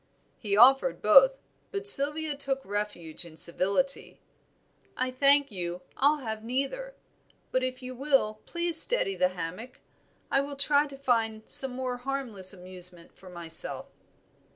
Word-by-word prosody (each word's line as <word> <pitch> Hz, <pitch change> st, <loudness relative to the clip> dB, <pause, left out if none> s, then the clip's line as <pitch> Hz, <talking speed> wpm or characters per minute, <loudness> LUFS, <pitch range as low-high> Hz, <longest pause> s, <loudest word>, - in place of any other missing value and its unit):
He 200 Hz, -2 st, -3 dB
offered 270 Hz, -, +4 dB
both; -, -, +4 dB, 0.3 s
but 405 Hz, 0 st, -1 dB
Sylvia 295 Hz, -2 st, +2 dB
took 270 Hz, -1 st, -5 dB
refuge 200 Hz, -6 st, -5 dB
in 165 Hz, -2 st, -11 dB
civility. 200 Hz, -, 0 dB, 0.8 s
"I 255 Hz, 0 st, -3 dB
thank 280 Hz, +1 st, +2 dB
you, 180 Hz, -2 st, -6 dB
I'll 290 Hz, +2 st, +1 dB
have 220 Hz, -1 st, -6 dB
neither; 275 Hz, -, -5 dB, 0.6 s
but 255 Hz, -, -1 dB
if 255 Hz, 0 st, -5 dB
you 255 Hz, 0 st, -8 dB
will 255 Hz, -5 st, -1 dB
please 340 Hz, -1 st, +7 dB
steady 340 Hz, -, +3 dB
the 180 Hz, -1 st, 0 dB
hammock, 185 Hz, +10 st, -8 dB, 0.5 s
I 275 Hz, -, +2 dB
will 285 Hz, 0 st, -8 dB
try 285 Hz, +1 st, +1 dB
to 275 Hz, -1 st, -13 dB
find 225 Hz, -5 st, -2 dB
some 265 Hz, -2 st, +5 dB
more 255 Hz, -1 st, -5 dB
harmless 245 Hz, -8 st, 0 dB
amusement 180 Hz, -2 st, -7 dB
for 190 Hz, -, -16 dB
myself." 170 Hz, -2 st, -1 dB
255 Hz, 140 wpm, -26 LUFS, 195-280 Hz, 0.8 s, please